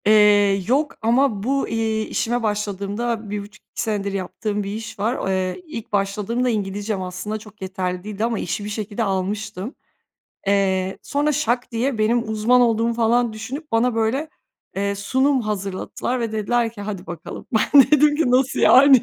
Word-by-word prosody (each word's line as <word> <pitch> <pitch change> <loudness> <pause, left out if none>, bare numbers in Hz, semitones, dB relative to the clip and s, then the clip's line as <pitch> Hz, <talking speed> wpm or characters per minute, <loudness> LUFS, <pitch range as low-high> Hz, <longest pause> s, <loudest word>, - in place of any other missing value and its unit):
Eee, 205 -2 +5
yok 290 +5 +1
ama 230 -2 +2
bu, 275 +3 0
iii, 220 -1 -1
işime 240 +1 -1
başladığımda 210 +2 -2
1.5-2 205 0 -4
yaptığım 205 +2 -3
bir 200 - -4
iş 225 0 -7
var. 225 +5 +1
O, - - -3
eee, 185 - -1
ilk 230 -8 -7
başladığımda 210 +5 0
İngilizcem 205 -1 -2
aslında 185 +4 -4
çok 215 -1 -15
yeterli 185 -1 -3
değildi 210 0 -4
ama 230 -1 -1
işi 205 - -3
bir - - -4
şekilde 210 +1 -3
almıştım. 200 - -3 0.7
Eee, 190 -1 +1
sonra 295 +1 0
şak 255 -4 0
diye 235 +1 -1
benim 225 +1 +1
uzman 220 +4 +3
olduğumu 230 -1 +2
falan 235 0 +2
düşünüp 255 +8 -7
bana 230 +1 +2
böyle, 230 +7 0 0.5
eee, 200 +1 0
sunum 260 +7 +1
hazırlattılar 210 +3 -3
ve 230 -2 -2
dediler 225 +2 0
ki: 220 - -10
"Hadi 200 -2 -5
bakalım." 170 -2 -8
Ben 270 +5 +6
dedim 300 0 +5
ki, 300 -5 +2
"Nasıl 260 +1 +2
yani?" 265 -1 +7
220 Hz, 160 wpm, -22 LUFS, 200-240 Hz, 0.7 s, yani